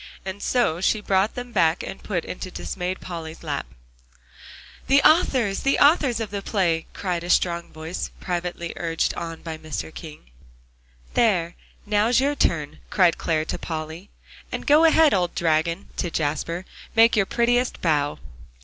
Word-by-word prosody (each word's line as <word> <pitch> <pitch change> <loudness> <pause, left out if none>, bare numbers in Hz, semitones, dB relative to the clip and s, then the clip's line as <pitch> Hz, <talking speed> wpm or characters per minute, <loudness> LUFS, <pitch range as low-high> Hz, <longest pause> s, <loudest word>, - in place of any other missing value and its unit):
And 190 +1 -5
so 180 -10 +1
she 215 - +2
brought 195 0 +1
them 245 0 -6
back 165 -5 +3
to - - -5
put 180 -5 -3
into 185 - -6
dismayed 180 0 -4
Polly's 165 -2 -7
lap. - - -3 1.2
"The 275 +1 +6
authors 260 - +3
the 275 - +2
authors 285 -6 +4
of 220 -3 -4
the 200 -1 -3
play!" 175 -6 0
cried 180 -3 -3
a 175 - -6
strong 170 -1 +1
voice, 160 +3 -5
privately 175 -1 -3
urged 165 -1 0
on 165 -1 -6
by 160 -1 -6
Mr. 155 0 -5
King. 150 - -11 0.8
"There, 180 -7 +2 0.3
now's 215 +4 +3
your 280 +2 +2
turn," 155 - -1
cried 180 -4 +3
Clare 155 -1 0
to - - -4
Polly. 160 +3 -6 0.4
"And - - -4
go 305 +2 +6
ahead, 320 -1 +5
old 180 -2 0
dragon," 165 +3 0
to 175 - -1
Jasper, 165 +3 -2 0.3
"make 230 +1 +6
your 200 -3 +2
prettiest 245 +1 +1
bow." 145 -4 +1
180 Hz, 155 wpm, -24 LUFS, 165-220 Hz, 1.2 s, The